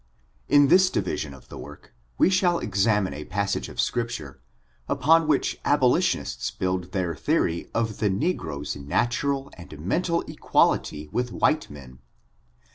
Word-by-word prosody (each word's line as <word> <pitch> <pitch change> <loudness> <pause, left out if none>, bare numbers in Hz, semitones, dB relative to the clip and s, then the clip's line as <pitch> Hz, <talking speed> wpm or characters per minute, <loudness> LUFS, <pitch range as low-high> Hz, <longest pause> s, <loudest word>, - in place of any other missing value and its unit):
In 145 -1 +6
this 185 +2 +6
division 85 - -2
of 65 -2 -15
the - - -9
work - - -12 0.2
we 190 - +4
shall 180 -2 +3
examine 105 - +1
a 75 +2 -6
passage 100 +1 -2
of - - -11
Scripture, 115 - -2 0.5
upon 165 +1 +4
which 150 -3 +1
abolitionists - - +1
build 90 -1 -3
their 90 -3 -1
theory 80 +2 0
of 115 -1 +1
Uie 100 -2 -1
negro's 85 - -2
natural 135 - -1
and 85 -4 -11
mental 170 - 0
equal - - +3
ity 75 0 -6
with 125 0 -1
white 155 0 +1
men. 65 -3 -12
105 Hz, 140 wpm, -25 LUFS, -, 0.5 s, In